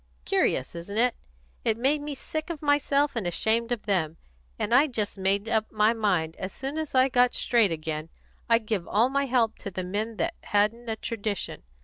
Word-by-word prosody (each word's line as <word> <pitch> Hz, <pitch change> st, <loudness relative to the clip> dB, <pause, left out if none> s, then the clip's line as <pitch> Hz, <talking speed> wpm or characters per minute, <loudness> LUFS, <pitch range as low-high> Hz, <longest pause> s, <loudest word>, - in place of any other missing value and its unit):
Curious, 130 Hz, -, +1 dB
isn't 175 Hz, +5 st, -6 dB
it? 245 Hz, +1 st, +3 dB, 0.5 s
It 220 Hz, -, +1 dB
made 275 Hz, +5 st, +2 dB
me 290 Hz, -1 st, -5 dB
sick 310 Hz, +4 st, -5 dB
of 315 Hz, -3 st, -5 dB
myself 290 Hz, -1 st, +2 dB
and 220 Hz, -6 st, -1 dB
ashamed 225 Hz, +6 st, +1 dB
of 240 Hz, -3 st, -2 dB
them, 165 Hz, -6 st, 0 dB, 0.4 s
and 230 Hz, -, -1 dB
I 275 Hz, +5 st, +6 dB
just 220 Hz, -6 st, -2 dB
made 195 Hz, +2 st, 0 dB
up 220 Hz, -1 st, 0 dB
my 215 Hz, +1 st, +3 dB
mind, 185 Hz, -8 st, 0 dB
as 185 Hz, 0 st, -4 dB
soon 275 Hz, +8 st, -4 dB
as 310 Hz, -4 st, -4 dB
I 260 Hz, 0 st, +6 dB
got 250 Hz, -1 st, +3 dB
straight 230 Hz, -6 st, +3 dB
again, 155 Hz, 0 st, -4 dB, 0.4 s
I'd 230 Hz, -1 st, +4 dB
give 210 Hz, -5 st, -2 dB
all 230 Hz, +5 st, +3 dB
my 280 Hz, +1 st, +1 dB
help 240 Hz, -3 st, +1 dB
to -, -, -5 dB
the 185 Hz, -1 st, -4 dB
men 210 Hz, +5 st, -3 dB
that 335 Hz, +8 st, 0 dB
hadn't 220 Hz, +3 st, 0 dB
a 220 Hz, -, -1 dB
tradition. 215 Hz, -3 st, -4 dB
225 Hz, 200 wpm, -27 LUFS, 200-255 Hz, 0.5 s, I